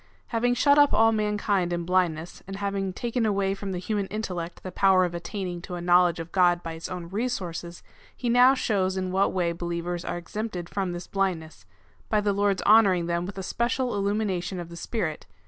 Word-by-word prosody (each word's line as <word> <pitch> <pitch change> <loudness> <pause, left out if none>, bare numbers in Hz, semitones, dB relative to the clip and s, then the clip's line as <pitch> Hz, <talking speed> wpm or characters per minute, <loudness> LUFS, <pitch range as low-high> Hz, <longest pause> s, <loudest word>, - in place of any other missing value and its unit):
Having 245 +1 +1
shut 285 +3 +5
up 290 -1 +5
all 225 0 +5
mankind 210 -4 0
in 170 -1 -2
blindness, 175 -2 0
and 195 - -6
having 195 -1 -2
taken 235 +5 -2
away 200 -2 +1
from 195 0 -5
the 185 - -3
human 200 +2 -2
intellect 180 -5 -5
the 185 - -6
power 185 0 +4
of 175 - -4
attaining 175 0 -5
to 180 0 -6
a - - -5
knowledge 175 -1 +4
of 165 0 -7
God 175 -2 +3
by 165 - -5
its 165 0 -7
own 180 -2 -6
resources, 180 -6 -4 0.3
he 245 - -3
now 250 +3 +6
shows 190 -6 0
in 185 -1 -2
what 195 +1 +2
way 175 -2 0
be 170 - -9
lievers 175 0 -3
are - - -3
exempted 180 0 -5
from 195 -3 -2
this 175 0 -6
blindness, 160 - -3 0.2
— - - -33
by 215 - +3
the 205 -1 +1
Lord's 200 -1 +1
honouring 200 -5 +5
them 170 +1 -1
with 195 - -8
a 190 - -4
special 245 +5 -1
illumination 200 -3 -1
of 170 -1 -7
the 170 - -9
Spirit. 170 -4 -3
190 Hz, 210 wpm, -26 LUFS, 175-210 Hz, 0.3 s, now